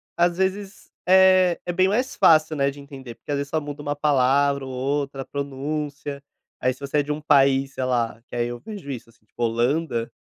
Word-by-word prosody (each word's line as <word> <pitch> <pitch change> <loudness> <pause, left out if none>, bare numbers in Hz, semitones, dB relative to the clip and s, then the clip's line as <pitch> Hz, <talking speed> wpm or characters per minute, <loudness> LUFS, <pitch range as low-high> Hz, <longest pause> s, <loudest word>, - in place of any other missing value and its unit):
às 175 0 +2
vezes 190 +1 -3 0.2
é 185 -1 +5
é 175 - -2
bem 185 +1 +3
mais 245 +7 0
fácil, 155 -1 +4
né, 140 -1 +1
de 140 +1 -9
entender 135 -4 -10
porque, - - -9
às 145 - 0
vezes, 140 0 -4
só 160 - 0
muda 145 -1 -7
uma 145 0 -3
palavra 140 -1 +2
ou 130 - -7
outra, 135 +1 -2
a - - -21
pronúncia, 140 0 -5 0.4
aí, 130 - +2
se 130 - -20
você 140 +1 -1
é - - +2
de 145 - -4
um 150 +1 -3
país, 135 -2 +3
sei 130 - -3
lá, 120 -3 -1
que - - -9
aí 120 0 0
eu 120 0 -6
vejo 200 - -9
isso, 120 -3 -7
assim, 110 - -26
tipo, 110 - -12
Holanda, 120 +1 0
140 Hz, 220 wpm, -23 LUFS, 130-155 Hz, 0.4 s, é